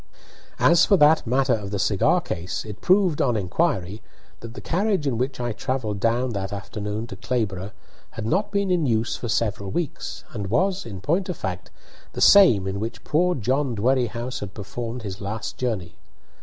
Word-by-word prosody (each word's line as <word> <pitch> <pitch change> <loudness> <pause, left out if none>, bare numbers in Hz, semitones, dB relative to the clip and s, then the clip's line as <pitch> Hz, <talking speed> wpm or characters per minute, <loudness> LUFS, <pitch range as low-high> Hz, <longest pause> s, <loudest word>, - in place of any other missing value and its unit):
As 170 -1 +5
for 200 - +4
that 150 -4 +5
matter 130 +2 +2
of 105 -3 -3
the 100 - -2
cigar 100 -1 +2
case, 90 +6 -4
it 105 -2 -8
proved, 185 -4 +3
on 120 -4 +2
inquiry, 100 - -1 0.4
that 115 +1 -10
the - - -6
carriage 195 -2 0
in 125 -5 0
which 130 +1 -2
I 120 -1 -1
travelled 110 -3 -3
down 120 +4 +1
that 100 -2 -3
afternoon 105 +2 -4
to 105 - -9
Clayborough 100 -4 -2 0.4
had 110 - -6
not 190 - 0
been 200 -2 0
in 170 -5 +2
use 115 -1 0
for 120 - -5
several 100 -1 -1
weeks, 95 - -4
and 105 -4 -4
was, 190 - +1
in 95 -4 -7
point 175 - 0
of 180 - -3
fact, 90 -1 -5 0.4
the - - -6
same 175 - +7
in 95 +1 -3
which 115 +2 -5
poor 180 +3 +2
John 130 +2 0
Dwerrihouse 120 +1 0
had 100 0 -7
performed 115 +3 -5
his 100 -1 -6
last 105 +2 -4
journey. 105 -9 -2
115 Hz, 185 wpm, -24 LUFS, 100-145 Hz, 0.4 s, same